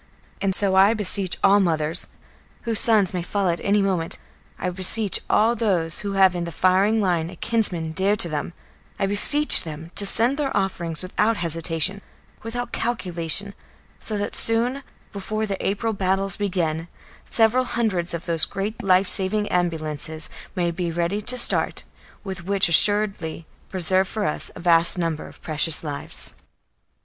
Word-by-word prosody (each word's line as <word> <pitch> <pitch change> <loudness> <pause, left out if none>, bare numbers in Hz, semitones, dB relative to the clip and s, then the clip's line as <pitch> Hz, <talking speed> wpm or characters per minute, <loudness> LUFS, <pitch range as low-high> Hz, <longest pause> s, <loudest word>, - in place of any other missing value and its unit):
And 195 -1 +3
so 195 -2 +3
I 195 +4 +5
beseech 195 -3 -1
all 200 +1 +5
mothers, 160 -4 0 0.6
whose 230 -2 -1
sons 210 -5 +3
may 180 - -2
fall 195 +2 -2
at 170 - -2
any 200 0 +1
moment; 180 -4 -2 0.4
I - - -4
beseech 190 +3 +4
all 225 +3 +2
those 180 -8 -1
who 200 -1 -5
have 190 -2 +4
in 175 -1 -4
the 170 - -6
firing 190 +6 +2
line 170 -3 -1
a 180 - -11
kinsman 180 -6 -1
dear 190 +5 0
to 185 - +1
them; 155 +1 -5 0.4
I - - -1
beseech 290 +10 +5
them 160 +1 -9
to 200 - +2
send 240 +7 +2
their 280 -6 -2
offerings 175 -4 0
without 210 +4 0
hesitation, 165 +3 0 0.4
without 245 +2 -6
calculation, 195 -4 -2 0.5
so 215 - -4
that 205 - -4
soon, 240 +4 -1 0.3
before 215 +2 -4
the 195 -2 -5
April 215 +3 -2
battles 195 0 0
begin, 170 -5 -2 0.4
several 235 +3 +2
hundreds 190 -9 -1
of 170 - -7
those 165 -2 +3
great 205 +3 -5
life 185 0 +2
saving 205 +3 0
ambulances 160 -3 -3 0.2
may 175 -2 -1
be 175 0 -4
ready 170 +5 -2
to 250 +4 +2
start, 240 - +3 0.4
which 190 -3 -7
will 200 +3 -3
assuredly 195 -2 +4 0.2
preserve 185 +1 0
for 215 +1 -4
us 150 - -3
a - - -10
vast 170 0 +3
number 165 -3 -3
of - - -17
precious 155 0 +2
lives. 145 -2 -3
190 Hz, 160 wpm, -22 LUFS, 170-210 Hz, 0.6 s, I